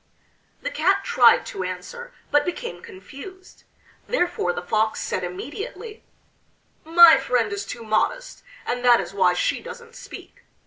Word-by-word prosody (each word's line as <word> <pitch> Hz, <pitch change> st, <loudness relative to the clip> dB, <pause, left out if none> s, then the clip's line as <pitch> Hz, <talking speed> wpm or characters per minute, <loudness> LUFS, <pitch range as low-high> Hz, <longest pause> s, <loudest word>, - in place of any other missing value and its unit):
The -, -, -3 dB
Cat 390 Hz, -3 st, +1 dB
tried 245 Hz, -9 st, +4 dB
to 190 Hz, -, -5 dB
answer 185 Hz, -, -7 dB, 0.2 s
but 290 Hz, 0 st, +4 dB
became 235 Hz, -, -5 dB
confused. 325 Hz, -, -13 dB, 0.4 s
Therefore 355 Hz, -, 0 dB
the 175 Hz, -, -5 dB
Fox 215 Hz, +3 st, 0 dB
said 185 Hz, -, -3 dB
immediately: 400 Hz, -, -7 dB, 0.8 s
"My 330 Hz, -1 st, +8 dB
friend 240 Hz, -6 st, 0 dB
is 200 Hz, 0 st, -5 dB
too 235 Hz, -, -7 dB
modest, 225 Hz, -, -1 dB, 0.2 s
and 245 Hz, 0 st, -3 dB
that 245 Hz, -1 st, +6 dB
is -, -, -6 dB
why 185 Hz, -2 st, +2 dB
she -, -, -1 dB
doesn't 475 Hz, -1 st, -11 dB
speak. -, -, -12 dB
250 Hz, 140 wpm, -23 LUFS, -, 0.8 s, My